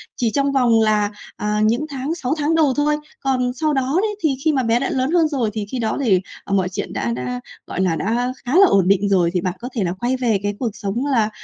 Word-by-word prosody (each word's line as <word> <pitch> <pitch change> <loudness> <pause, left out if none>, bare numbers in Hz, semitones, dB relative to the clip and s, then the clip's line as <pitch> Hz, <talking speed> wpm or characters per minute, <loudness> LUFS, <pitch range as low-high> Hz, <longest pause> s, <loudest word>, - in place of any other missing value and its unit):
chỉ 235 -3 0
trong 280 0 +1
vòng 245 -4 +3
là, 210 -1 +2 0.2
à, 210 0 -1
những 235 +7 +1
tháng 280 +3 -3
6 280 -5 -2
tháng 300 +2 +1
đầu 305 -5 +3
thôi. 300 +1 +2 0.2
Còn 255 -2 0
sau 305 -1 +2
đó 270 +3 0
đấy, 425 0 -1
thì 295 -4 +2
khi 315 - +4
mà 265 -2 +1
bé 230 0 +2
đã 275 - -1
lớn 260 +3 0
hơn 335 -2 +4
rồi, 260 -8 -1
thì 215 -1 -3
khi 255 - -3
đó 220 -2 -1
thì, 190 -5 +4 0.2
ờ, 195 - -4
mọi 190 -2 +2
chuyện 185 - -5
đã 115 0 -1
đã, 125 0 -4 0.3
gọi - - -3
là, 180 -3 +1
đã 240 +7 -1
khá 250 +5 -1
là 395 - +8
ổn 195 - +3
định 200 +1 +3
rồi 180 -4 +3
thì 180 - 0
bạn 180 0 -1
có 245 - -6
thể 220 - 0
là 175 -1 -1
quay 245 +2 0
về 235 -5 +1
cái 205 0 -1
cuộc 245 - 0
sống 215 +5 -3
là 235 -7 +2
240 Hz, 270 wpm, -20 LUFS, 205-275 Hz, 0.3 s, là